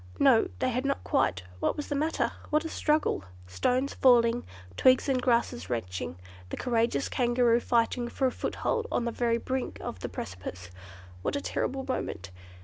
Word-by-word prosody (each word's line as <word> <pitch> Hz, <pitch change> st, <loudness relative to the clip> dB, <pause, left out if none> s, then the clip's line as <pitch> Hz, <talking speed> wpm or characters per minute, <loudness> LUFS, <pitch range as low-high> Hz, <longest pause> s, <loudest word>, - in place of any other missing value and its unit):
No! 255 Hz, -5 st, +5 dB
they 255 Hz, -, +1 dB
had 250 Hz, +2 st, -1 dB
not 275 Hz, 0 st, -1 dB
quite: 90 Hz, 0 st, +1 dB, 0.2 s
what -, -, 0 dB
was 295 Hz, -, -4 dB
the -, -, 0 dB
matter? 310 Hz, +3 st, 0 dB, 0.2 s
What 305 Hz, +2 st, +2 dB
a -, -, -3 dB
struggle! 300 Hz, -, +1 dB, 0.2 s
Stones 250 Hz, -, 0 dB
falling, 240 Hz, -2 st, +4 dB, 0.3 s
twigs 255 Hz, -, +4 dB
and 260 Hz, -2 st, +1 dB
grasses 240 Hz, 0 st, +1 dB
wrenching, 90 Hz, -8 st, -3 dB, 0.3 s
the -, -, -5 dB
courageous 235 Hz, +1 st, +1 dB
Kangaroo 240 Hz, -2 st, +3 dB
fighting 240 Hz, 0 st, +1 dB
for 265 Hz, -, -1 dB
a 255 Hz, -, +3 dB
foothold 460 Hz, -, -2 dB
on 240 Hz, -, 0 dB
the 235 Hz, -, -1 dB
very 235 Hz, 0 st, +1 dB
brink 260 Hz, +2 st, -3 dB
of 95 Hz, -, -6 dB
the -, -, -4 dB
precipice. 90 Hz, -1 st, -7 dB, 0.5 s
What -, -, -1 dB
a -, -, +1 dB
terrible 265 Hz, -1 st, -2 dB
moment! 100 Hz, -, -3 dB
240 Hz, 170 wpm, -29 LUFS, 225-265 Hz, 0.5 s, No